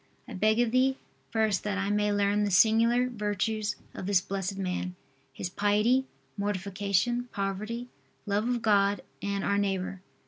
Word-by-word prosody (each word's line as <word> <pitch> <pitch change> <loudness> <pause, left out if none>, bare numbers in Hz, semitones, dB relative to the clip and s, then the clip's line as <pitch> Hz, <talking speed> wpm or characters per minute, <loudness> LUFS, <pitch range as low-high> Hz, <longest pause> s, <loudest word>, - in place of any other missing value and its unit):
I - - -8
beg 215 +3 +2
of 240 -2 +2
Thee, 260 +2 +3 0.3
first, 220 -4 +1
that 205 -1 -1
I 200 +1 0
may 210 0 +2
learn 205 0 +2
the 205 - +1
singular 230 +5 +4
virtues 210 -1 -1 0.2
of 185 - -6
this 200 -2 +4
blessed 195 +1 -4
man 180 -1 -3 0.4
his 135 - -4
piety, 210 +7 +2 0.3
mortification, 200 +4 -1
poverty, 215 +4 -3 0.4
love 205 +2 0
of 240 -2 -1
God 200 -2 +3 0.2
and 200 0 -2
our 200 0 +1
neighbor. 190 -2 -2
205 Hz, 150 wpm, -29 LUFS, 195-225 Hz, 0.4 s, singular